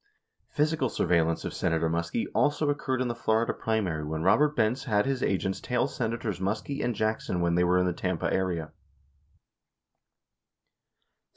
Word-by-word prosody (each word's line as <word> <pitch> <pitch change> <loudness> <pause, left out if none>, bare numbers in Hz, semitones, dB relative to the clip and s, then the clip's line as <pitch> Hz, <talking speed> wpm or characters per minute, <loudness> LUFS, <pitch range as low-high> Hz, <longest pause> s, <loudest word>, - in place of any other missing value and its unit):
58 - - -34
Physical 150 -3 +2
surveillance 85 -4 +1
of - - -4
Senator 80 0 0
Muskie 85 +7 -1
also 145 0 +2
occurred 130 -3 -2
in - - -2
the 120 - -1
Florida 115 0 +1
primary 95 -9 -1
when 80 +1 -3
Robert 150 - +4
Benz 120 +2 +1
had 105 -1 +2
his 135 -1 -1
agents 95 -2 -1
tail 125 - 0
Senators 115 -7 -3
Muskie 110 +9 -2
and 120 - -1
Jackson 110 -4 -1
when 85 -1 +1
they 90 +1 +3
were 90 +1 +3
in 90 - +3
the 90 - 0
Tampa 90 -1 -2
area. 90 -4 -1
105 Hz, 160 wpm, -28 LUFS, 90-125 Hz, -, Robert